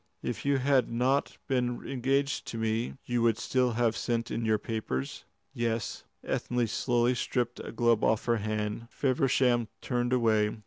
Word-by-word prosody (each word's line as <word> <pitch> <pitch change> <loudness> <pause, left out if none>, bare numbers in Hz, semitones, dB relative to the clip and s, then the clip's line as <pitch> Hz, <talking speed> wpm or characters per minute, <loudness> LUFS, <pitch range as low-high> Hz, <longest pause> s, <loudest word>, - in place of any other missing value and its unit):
"If - - -4
you 140 -1 +3
had 135 -2 +3
not 130 +4 +1
been 125 -2 -1
engaged 135 +2 0
to 115 - -5
me, 115 +1 -1
you 120 -1 0
would 115 -2 +3
still 125 -1 +1
have 115 -1 +1
sent 115 0 -1
in 115 - -2
your 110 -1 +3
papers?" 105 - -4 0.3
"Yes." 115 -2 -2 0.2
Ethne 120 -1 0
slowly 120 +2 +1
stripped 120 -1 -1
a - - -6
glove 115 -1 +2
off 110 -1 +2
her 120 -1 +2
hand. 105 +1 -3
Feversham 130 -3 +2
turned 120 -1 -1
away. 110 -3 +2
120 Hz, 160 wpm, -29 LUFS, 115-125 Hz, 0.3 s, you